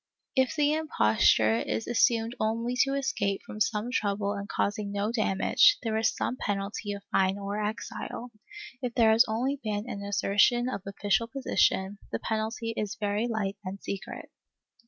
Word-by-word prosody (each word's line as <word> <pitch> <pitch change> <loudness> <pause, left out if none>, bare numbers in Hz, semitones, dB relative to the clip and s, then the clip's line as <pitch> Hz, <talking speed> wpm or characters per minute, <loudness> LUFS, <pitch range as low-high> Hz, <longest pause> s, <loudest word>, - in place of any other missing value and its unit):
If 260 -2 +2
the 295 -1 +3
imposture 110 - +3
is 220 - -2
assumed 230 0 +2
only 230 +3 -1
to 275 0 -1
escape 200 -8 -1
from 215 - -8
some 230 0 0
trouble 200 -3 0
and 200 0 -6
causing 205 0 -1
no 205 +2 -1
damage, 235 - +4
there 225 -2 -1
is 220 0 +2
some 255 - -2
penalty 205 +2 -3
of 200 0 -8
fine 190 +1 +2
or 200 +1 -3
exile; 230 +2 -5 0.5
if 245 -2 -3
there 225 -3 +5
has 225 +3 +6
been - - -4
only 265 +4 -1
an 210 -1 -3
assertion 205 +4 +2
of 255 - -4
official 200 +2 0
position, 205 -6 +1
the - - -1
penalty 225 +1 -2
is 210 -1 -3
very 210 +2 0
light 205 -4 -2
and 190 +1 -6
secret. 195 -1 -6
215 Hz, 160 wpm, -28 LUFS, 200-240 Hz, 0.5 s, has